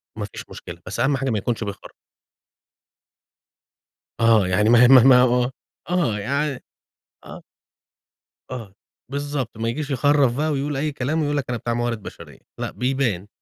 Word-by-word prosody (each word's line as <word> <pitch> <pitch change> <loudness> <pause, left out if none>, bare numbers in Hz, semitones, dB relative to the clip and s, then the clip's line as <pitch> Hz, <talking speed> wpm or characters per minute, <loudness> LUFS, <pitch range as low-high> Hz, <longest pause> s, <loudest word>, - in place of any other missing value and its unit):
ما - - -4
فيش - - -10
مشكلة، 85 0 -10
بس 100 - -6
أهم 135 0 +2
حاجة 135 0 -2
ما 110 - 0
يكونش 115 +2 -2
بيخَر 100 -1 -7 2.3
آه، 115 -4 +4
يعني 105 +4 +2
ما 120 +1 +7
هي - - +8
ما 130 -2 +8
ه - - +3
ما 125 -2 +7
ه - - +6
آه، 125 +1 +1 0.6
آه. - - -4
يعني 140 +3 -2 0.6
آه. - - -10 1.1
آه، 110 -7 -7 0.4
بالضبط. 140 -5 -4
ما 115 +1 -2
ييجيش 145 +5 -3
يخرّف 135 -1 +2
بقى 155 +1 0
ويقول 140 0 -2
أي 150 +2 -1
كلام 145 +4 -2
ويقول 145 0 0
لك 140 - -2
أنا 120 - -1
بتاع 120 +2 -3
موارد 120 -2 -2
بشرية - - -11 0.2
لأ، - - -3
بيبان. 125 -7 -1
125 Hz, 170 wpm, -22 LUFS, 115-140 Hz, 2.3 s, هي